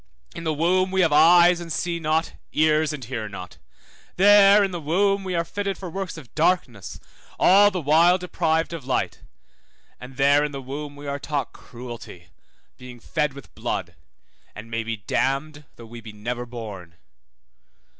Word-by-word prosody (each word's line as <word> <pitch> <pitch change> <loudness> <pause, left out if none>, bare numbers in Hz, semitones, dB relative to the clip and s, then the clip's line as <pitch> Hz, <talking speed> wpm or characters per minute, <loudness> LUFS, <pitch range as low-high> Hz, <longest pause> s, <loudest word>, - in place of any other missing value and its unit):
In 165 - -8
the 160 - 0
womb 185 +4 +2
we 190 0 +1
have 165 -4 +2
eyes 170 +3 +6
and 170 -1 -8
see 170 +2 -2
not, 160 +1 -1 0.2
ears 155 0 +2
and 140 -5 -7
hear 110 -3 -5
not. 90 -3 -10 0.6
There 200 +1 +6
in 195 - -1
the 175 -2 -5
womb 195 +6 +1
we 185 -2 -3
are 170 0 0
fitted 200 +2 -4
for 185 -3 -8
works 190 -1 -5
of 140 -7 -13
darkness, 135 - -1 0.4
all 200 +2 +6
the 185 -3 -4
while 165 +5 +5
deprived 165 -2 -1
of 165 -5 -6
light; 130 - -2 0.8
and 130 +1 -11
there 140 +1 +4
in 150 -1 -3
the 135 - -5
womb 145 +2 -7
we 145 0 -11
are 140 0 -4
taught 140 -3 -3
cruelty, 120 -6 -10
by - - -35 0.4
being 125 -1 -11
fed 150 +3 -2
with 140 - -13
blood, 85 - -4 0.6
and 110 +2 -10
may 115 0 -2
be 115 0 -4
damned, 140 +8 -2
though 115 - -12
we 115 +1 -11
be 110 0 -10
never 120 +3 -5
born. 105 -8 -9
150 Hz, 175 wpm, -23 LUFS, 125-175 Hz, 0.8 s, eyes